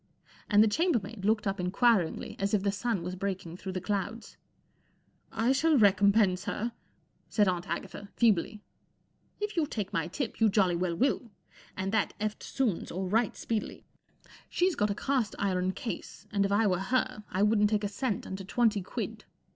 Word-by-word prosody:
And 210 0 +6
the - - +4
chambermaid 235 - 0
looked 215 0 +2
up 195 -1 -1
inquiringly, 185 0 +1
as 200 +2 +1
if 195 - 0
the 200 - +2
sun 205 -2 -1
was 180 +1 -4
breaking 185 -3 -4
through 190 0 -6
the 185 - -2
clouds, 205 +3 -3 1.0
1 - - -10
I 250 - +5
shall 305 +3 +3
recompense 200 -2 +4
her," 230 +3 -2 0.6
said 210 -3 +3
Aunt 175 -2 -1
Agatha, 200 +4 -5
feebly. 210 -2 +2 0.8
"If 420 0 -3
you 320 -4 +1
take 210 -6 -4
my 165 -4 0
tip, 225 +7 -4
you 220 - +6
jolty 195 -3 +3
well 175 -1 -1
will, 255 +2 0 0.5
and 190 +1 -2
that 220 -2 0
eftsoones 215 0 -2
or 185 +2 -3
right 225 +1 +1
speedily* 225 -2 -3 0.6
Site's 365 +1 +2
got 210 -8 +1
a 200 - -1
cast 255 -4 0
iron 185 -2 0
case, 225 -2 -6
and 200 -1 +2
if - - -6
I 210 +2 +3
were 180 -3 +2
her 250 +2 -1
I 190 - +1
wouldn't 210 -1 +4
take 210 -1 0
a - - +1
cent 205 +1 -2
under 190 +1 -6
twenty 215 +1 +1
quid. 180 - -5
205 Hz, 180 wpm, -30 LUFS, 190-230 Hz, 1.0 s, And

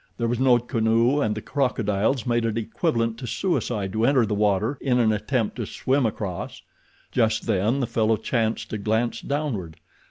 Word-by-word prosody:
There 115 - 0
was 120 0 -1
no 130 -2 +5
canoe 115 +3 +1
and 105 -3 0
the 110 - -6
crocodiles 115 -3 0
made 120 -1 +1
it 115 -1 -1
equivalent 115 -1 -1
to 125 - -6
suicide 110 - -1
to 110 +1 0
enter 130 -1 +4
the 105 - -2
water 105 +5 +1
in 125 -3 +1
an 115 -3 +3
attempt 110 +2 -1
to 115 -4 -3
swim 135 -2 +1
across. 100 -4 -5 0.5
Just 110 -3 +1
then 110 +5 +1
the - - +1
fellow 110 -2 +1
chanced 110 +1 -1
to 110 - -3
glance 110 +3 0
downward. 115 - -3
115 Hz, 180 wpm, -24 LUFS, 110-125 Hz, 0.5 s, no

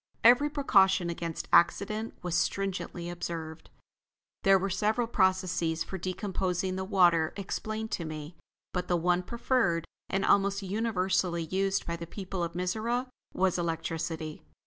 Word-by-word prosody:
Every 250 +5 +6
precaution 195 - +3
against 170 -1 -4
accident 215 +6 +3
was 180 -2 -3
stringently 185 -1 -1
observed. 165 -2 -6 0.7
There 195 0 +6
were 195 +1 -2
several 215 +5 +1
processes 185 -6 +1
for 190 - -6
decomposing 185 0 -2
the 190 - -2
water 175 -5 +3
explained 215 +2 -4
to 170 - -2
me, 155 +1 -7 0.4
but 180 -1 -2
the 175 - +2
one 175 +1 +2
preferred, 230 -5 0 0.2
and 195 0 0
almost 200 0 +3
universally 185 -4 0
used 195 +4 0
by 170 0 -3
the 170 0 -7
people 190 -1 -4
of 170 0 -3
Mizora, 220 +8 -1 0.3
was 185 -1 +2
electricity. 165 -1 -3
185 Hz, 135 wpm, -29 LUFS, 170-200 Hz, 0.7 s, Every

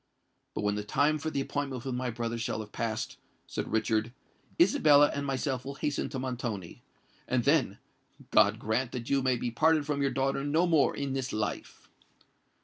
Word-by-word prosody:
"But - - -2
when 105 0 +1
the 105 0 -3
time 145 +8 +2
for 160 - -2
the 140 - -1
appointment 135 -3 -3
with 130 - -2
my 125 0 -2
brother 115 0 -3
shall 115 -1 -2
have 105 -1 -10
passed," 110 -1 -3 0.3
said - - -5
Richard 110 0 +1 0.5
"Isabella 150 - +6
and 140 0 -3
myself 135 -1 -1
will 140 +1 -6
hasten 145 +1 -2
to - - -5
Montoni; 120 -8 -4 0.5
and 125 -2 +1
then, 140 -8 +2 0.5
God 105 0 +5
grant 115 +3 -1
that 125 0 -5
you 140 -1 +3
may 130 -1 +2
be 120 0 -3
parted 155 +4 +3
from 145 -1 -1
your 140 - +2
daughter 135 +1 0
no 155 +5 +2
more 160 -5 +3
in 140 -1 -3
this 135 -1 -2
life." 105 -1 -4
130 Hz, 185 wpm, -29 LUFS, 115-145 Hz, 0.5 s, Isabella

